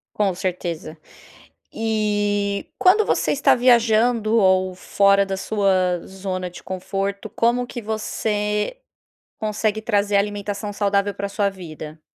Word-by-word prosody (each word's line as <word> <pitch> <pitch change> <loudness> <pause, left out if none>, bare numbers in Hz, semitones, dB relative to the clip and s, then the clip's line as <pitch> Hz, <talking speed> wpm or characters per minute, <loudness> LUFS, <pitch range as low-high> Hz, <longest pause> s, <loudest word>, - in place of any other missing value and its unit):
Com 200 -3 +1
certeza. 175 -3 -4 0.8
E 205 -2 -1
quando 405 +4 +5
você - - +1
está 285 - +4
viajando 235 -2 +3
ou 185 -2 +3
fora 200 +1 +3
da 195 0 -3
sua 190 -4 +1
zona 185 -1 -5
de 175 - -12
conforto, 195 +2 -4
como 240 +3 +1
que 240 0 -6
você 210 - -2 0.6
consegue 215 0 -1
trazer 205 -2 +1
alimentação 205 +1 -2
saudável 200 0 +1
pra 200 +1 -3
a - - -5
sua 200 0 0
vida? 155 -4 -9
205 Hz, 125 wpm, -22 LUFS, 190-215 Hz, 0.8 s, quando